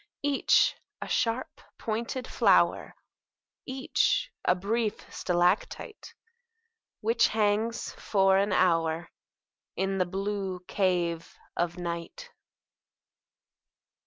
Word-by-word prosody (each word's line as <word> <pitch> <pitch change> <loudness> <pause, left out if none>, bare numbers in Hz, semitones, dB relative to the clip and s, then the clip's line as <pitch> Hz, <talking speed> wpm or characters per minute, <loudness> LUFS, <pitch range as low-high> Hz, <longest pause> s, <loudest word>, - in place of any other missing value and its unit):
Each 285 -1 +3 0.2
a - - -6
sharp 235 +2 -1 0.2
pointed 235 +3 -3
flower, - - +3 0.7
Each 270 - 0
a 180 - +3
brief 215 +3 -1 0.2
stalactite 180 - -1 0.9
Which 230 +1 +3
hangs 220 +2 0
for 195 -2 +2
an 200 +1 +1
hour 165 -2 +1 0.6
In 195 +1 -1
the 180 - +1
blue 195 -1 -3
cave 175 -4 -1 0.2
of 175 +1 -1
night. 175 - -6
195 Hz, 85 wpm, -28 LUFS, 180-230 Hz, 0.9 s, Each